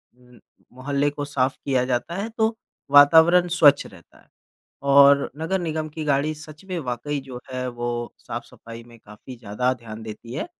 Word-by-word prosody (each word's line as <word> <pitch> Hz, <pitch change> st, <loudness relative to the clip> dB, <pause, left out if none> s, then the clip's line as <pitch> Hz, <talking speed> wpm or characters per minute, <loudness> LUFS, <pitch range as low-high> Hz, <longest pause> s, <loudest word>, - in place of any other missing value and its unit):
उ 125 Hz, -1 st, -21 dB, 0.4 s
मोहल्ले 140 Hz, +3 st, -1 dB
को 145 Hz, 0 st, -6 dB
साफ 135 Hz, -2 st, -1 dB
किया 130 Hz, -3 st, +1 dB
जाता 125 Hz, +7 st, -2 dB
है, 200 Hz, +4 st, -3 dB
तो 225 Hz, 0 st, -1 dB, 0.3 s
वातावरण 160 Hz, +5 st, +6 dB
स्वच्छ 155 Hz, -5 st, +4 dB
रहता 95 Hz, -4 st, -17 dB
है। -, -, -27 dB, 0.7 s
और 140 Hz, 0 st, +6 dB
नगर 185 Hz, +4 st, -1 dB
निगम 160 Hz, -2 st, -3 dB
की 155 Hz, +1 st, -7 dB
गाड़ी 145 Hz, +1 st, +1 dB
सच 155 Hz, +2 st, -13 dB
में 180 Hz, -2 st, -3 dB
वाक़ई 135 Hz, +1 st, -4 dB
जो 125 Hz, -2 st, -8 dB
है 130 Hz, 0 st, -3 dB
वो 120 Hz, 0 st, -5 dB, 0.3 s
साफ़-सफाई 115 Hz, 0 st, -9 dB
में 120 Hz, -1 st, -16 dB
काफ़ी 110 Hz, +4 st, -13 dB
ज़्यादा 120 Hz, +3 st, -1 dB
ध्यान 110 Hz, -1 st, -9 dB
देती 110 Hz, +2 st, -9 dB
है। 155 Hz, -, -3 dB
140 Hz, 170 wpm, -23 LUFS, 125-155 Hz, 0.7 s, वातावरण